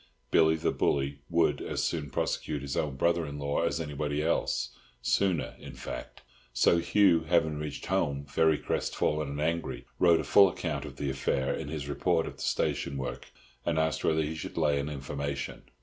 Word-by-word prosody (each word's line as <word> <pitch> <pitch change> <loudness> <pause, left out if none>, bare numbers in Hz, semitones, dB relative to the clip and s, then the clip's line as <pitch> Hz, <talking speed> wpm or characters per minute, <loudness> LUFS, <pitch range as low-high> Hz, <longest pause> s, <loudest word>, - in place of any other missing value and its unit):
Billy 80 -1 +5
the 80 - 0
Bully 70 0 0
would 85 -1 +2
as - - -2
soon 75 -4 -1
prosecute 70 +2 -2
his 70 -1 -3
own 75 -3 -1
brother 85 +4 +2
in 70 0 -6
law 70 +1 -1
as 85 0 0
anybody 75 -1 -2
else—sooner, 70 0 -1
in - - -10
fact. - - -7 0.3
So 85 +7 +4
Hugh, 85 0 +4
having 80 -3 +2
reached 75 -1 -5
home 70 -7 0
very 80 +2 +3
crest - - -2
fallen 75 -1 0
and 70 +1 -4
angry, 85 +2 -2
wrote 85 -2 +5
a - - -1
full 100 -1 +6
account 80 -5 -3
of 70 -2 -8
the 70 -1 -2
affair 65 0 0
in - - -4
his 75 -2 -4
report 80 +3 +1
of - - -7
the - - -10
station 70 - 0
work, 60 -2 -5 0.4
and 85 -2 0
asked 80 0 +1
whether 80 0 +2
he 75 +1 -3
should 80 - -7
lay 75 -3 +2
an 70 +1 -2
information. 70 0 -4
75 Hz, 185 wpm, -29 LUFS, 70-80 Hz, 0.4 s, full